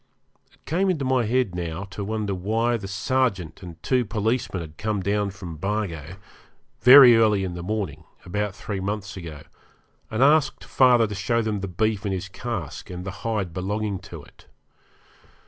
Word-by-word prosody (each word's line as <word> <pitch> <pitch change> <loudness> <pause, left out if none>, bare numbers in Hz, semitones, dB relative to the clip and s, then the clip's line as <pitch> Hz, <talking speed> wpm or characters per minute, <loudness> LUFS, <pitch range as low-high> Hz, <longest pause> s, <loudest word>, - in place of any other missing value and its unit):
It - - -29
came 185 +5 +1
into 155 -7 0
my 130 -2 +2
head 120 -3 +1
now 85 0 -4
to 100 - -5
wonder 105 -1 -2
why 110 +6 0
the 105 -4 -5
sergeant 95 -4 -1
and 85 -3 -10
two 125 -2 +2
policemen 110 -1 -1
had 75 -2 -10
come 105 -2 -1
down 100 +1 0
from 90 -4 -8
Bargo, 90 -4 -3 0.6
very 125 -1 +9
early 105 -3 +3
in 90 -2 -3
the 85 - -6
morning, 90 -6 -3 0.2
about 105 +2 -2
three 100 -3 -5
months 100 -1 -4
ago, 80 -5 -8 0.7
and 110 +4 +1
asked 150 0 +3
father 125 -3 +4
to 105 - -5
show 115 +4 0
them 110 -2 -1
the 100 - -4
beef 105 +3 -1
in 100 - -2
his 95 +1 -4
cask, 95 - -5
and 90 0 -7
the 95 - -4
hide 105 -7 -2
belonging 100 +2 -2
to 85 -6 -10
it. - - -20
105 Hz, 175 wpm, -24 LUFS, 95-115 Hz, 0.7 s, very